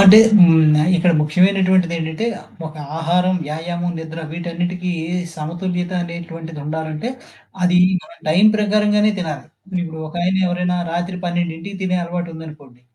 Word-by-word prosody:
అంటే. 200 Hz, +2 st, +10 dB, 0.2 s
హ్మ్. 175 Hz, -3 st, +7 dB, 0.4 s
ఇక్కడ 175 Hz, +1 st, +3 dB
ముఖ్యమైనటువంటిది 185 Hz, +2 st, +3 dB
ఏంటంటే. 160 Hz, +7 st, -3 dB, 0.4 s
ఒక 155 Hz, -, -9 dB, 0.2 s
ఆహారం, 180 Hz, +3 st, +1 dB
వ్యాయామం, 175 Hz, +3 st, -3 dB
నిద్ర 160 Hz, 0 st, -7 dB
వీటన్నిటికీ 175 Hz, +2 st, -3 dB, 0.4 s
సమతుల్యత 175 Hz, +3 st, -3 dB
అనేటువంటిది 165 Hz, -2 st, -7 dB
ఉండాలంటే. 155 Hz, +6 st, -4 dB, 0.5 s
అది 180 Hz, 0 st, +4 dB, 0.2 s
మన -, -, -16 dB, 0.2 s
టైం 180 Hz, +7 st, +5 dB
ప్రకారంగానే 210 Hz, 0 st, +2 dB
తినాలి. 155 Hz, -5 st, -4 dB, 0.4 s
ఇప్పుడు 160 Hz, -2 st, -6 dB
ఒకాయన 175 Hz, +3 st, -1 dB
ఎవరైనా 180 Hz, 0 st, -1 dB, 0.2 s
రాత్రి 175 Hz, +2 st, -3 dB
12కి 175 Hz, +2 st, -3 dB
తినే 185 Hz, -1 st, 0 dB
అలవాటు 175 Hz, 0 st, -4 dB
ఉందనుకోండి. 150 Hz, -6 st, -12 dB
175 Hz, 120 wpm, -19 LUFS, 160-185 Hz, 0.5 s, అంటే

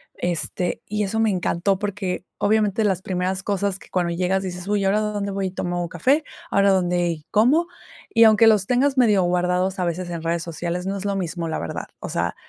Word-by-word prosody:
este, 175 Hz, +1 st, -2 dB
y 210 Hz, 0 st, -1 dB
eso 210 Hz, +3 st, -2 dB
me 225 Hz, -1 st, +3 dB
encantó, 185 Hz, 0 st, 0 dB
porque 195 Hz, -3 st, -3 dB
obviamente 215 Hz, 0 st, +2 dB
las 190 Hz, -3 st, +1 dB
primeras 185 Hz, +1 st, -2 dB
cosas 200 Hz, -1 st, -1 dB
que -, -, -16 dB
cuando 175 Hz, -2 st, 0 dB
llegas 185 Hz, +2 st, 0 dB
dices: 180 Hz, 0 st, -6 dB
"Uy, 205 Hz, -1 st, +1 dB
¿ahora 195 Hz, +2 st, +2 dB
dónde 205 Hz, -1 st, -2 dB
voy 195 Hz, -1 st, -2 dB
y -, -, -5 dB
tomo 175 Hz, -1 st, -3 dB
café? 265 Hz, -, +2 dB, 0.3 s
¿Ahora 200 Hz, 0 st, +4 dB
dónde 175 Hz, -3 st, 0 dB
como?". 270 Hz, +11 st, +3 dB, 0.4 s
Y 230 Hz, -, +5 dB
aunque 220 Hz, 0 st, +6 dB
los 210 Hz, -3 st, +4 dB
tengas 265 Hz, +4 st, +1 dB
medio 215 Hz, -6 st, +4 dB
guardados 180 Hz, +2 st, 0 dB
a 180 Hz, -, +1 dB
veces 175 Hz, +1 st, -3 dB
en 170 Hz, -2 st, -5 dB
redes 170 Hz, 0 st, -1 dB
sociales, 175 Hz, +2 st, -4 dB
no 195 Hz, +1 st, -2 dB
es 195 Hz, -, -6 dB
lo 200 Hz, -1 st, 0 dB
mismo, 170 Hz, -2 st, -3 dB
la 160 Hz, -, -2 dB
verdad. 85 Hz, -, -5 dB
O -, -, -6 dB
sea, -, -, -1 dB
190 Hz, 205 wpm, -22 LUFS, 175-210 Hz, 0.4 s, aunque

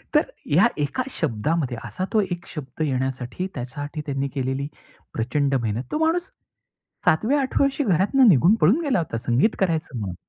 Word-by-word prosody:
तर -, -, +7 dB, 0.3 s
या 180 Hz, +10 st, +6 dB
एका 150 Hz, -, -1 dB, 0.2 s
शब्दामध्ये, 140 Hz, 0 st, -1 dB
असा 185 Hz, -, -3 dB
तो 215 Hz, -, +4 dB
एक 175 Hz, -1 st, -4 dB
शब्द 140 Hz, -1 st, -7 dB
येण्यासाठी, 130 Hz, +4 st, -2 dB
त्याच्यासाठी 145 Hz, +4 st, -5 dB
त्यांनी 140 Hz, -2 st, -1 dB
केलेली 135 Hz, +1 st, -1 dB, 0.5 s
प्रचंड 135 Hz, +4 st, 0 dB
मेहनत. 115 Hz, +2 st, -2 dB
तो -, -, 0 dB
माणूस 340 Hz, +2 st, +1 dB, 0.8 s
सातव्या, 230 Hz, -, +3 dB
आठव्या 270 Hz, +1 st, +1 dB
वर्षी 275 Hz, +1 st, 0 dB
घरातून 210 Hz, -, +4 dB
निघून 175 Hz, -, +6 dB
पळून 205 Hz, -, +4 dB
गेला 265 Hz, -4 st, +2 dB
होता. 160 Hz, -8 st, -2 dB
संगीत 130 Hz, -, +2 dB
करायचं 165 Hz, -8 st, 0 dB
म्हणून. 95 Hz, -4 st, -4 dB
150 Hz, 160 wpm, -23 LUFS, 130-200 Hz, 0.8 s, तर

